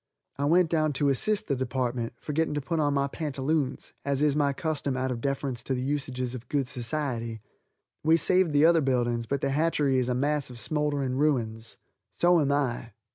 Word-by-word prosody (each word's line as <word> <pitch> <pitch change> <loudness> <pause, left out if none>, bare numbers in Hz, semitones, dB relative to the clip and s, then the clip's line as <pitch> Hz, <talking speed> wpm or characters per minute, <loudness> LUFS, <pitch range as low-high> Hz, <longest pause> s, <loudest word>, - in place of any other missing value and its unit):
I 140 - +1
went 170 +2 +3
down 155 -2 +2
to 140 +1 +1
assist 210 - +1
the 140 - 0
department, 125 -2 -2
forgetting 150 +3 -1
to - - 0
put 165 +4 -2
on 145 -2 +1
my 140 0 +2
pantaloons 140 -1 -2
as 140 0 0
is 145 -2 +3
my 145 -2 +2
custom 140 -2 -2
out 130 0 -1
of 120 -2 -4
deference 135 -2 -2
to 130 +2 -2
the 125 - -3
usages 130 -3 -2
of 125 -1 -8
good 140 -3 0
society. 120 -3 -3 0.6
We 160 +2 +5
saved 185 +2 +3
the 145 +1 +4
other 165 -1 +5
buildings, 120 -3 0
but 140 +2 -1
the 140 - 0
hatchery 145 -3 +2
is 125 0 0
a 125 - +1
mass 145 +2 0
of 125 - -10
smoldering 140 +1 -1
ruins. 115 -7 0 0.3
So 175 -1 +3
am 140 -1 +1
I. 120 -5 -1
140 Hz, 195 wpm, -27 LUFS, 125-150 Hz, 0.6 s, We